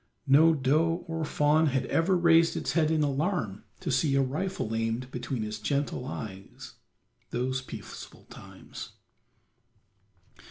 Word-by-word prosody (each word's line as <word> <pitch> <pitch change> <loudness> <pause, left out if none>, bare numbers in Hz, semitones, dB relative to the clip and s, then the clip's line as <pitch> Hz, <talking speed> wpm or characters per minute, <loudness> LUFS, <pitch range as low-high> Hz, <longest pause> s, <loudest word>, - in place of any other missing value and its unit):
No 155 +4 +6
doe 155 +5 +1
or 165 0 -3
fawn 150 +1 +3
had 135 -2 0
ever 180 +3 +2
raised 165 -1 +4
its - - -2
head 155 -2 +2
in 160 -1 +2
alarm 140 - -1 0.2
to - - -2
see 135 +2 +2
a 135 - +4
rifle 150 - -3
aimed 115 +3 -2
between 125 -5 -3
its 105 0 -5
gentle 140 +2 -2
eyes 95 -6 -8 0.6
those 130 +2 -1
peaceful 130 - -10
times. - - -11
140 Hz, 130 wpm, -28 LUFS, 125-165 Hz, 0.6 s, No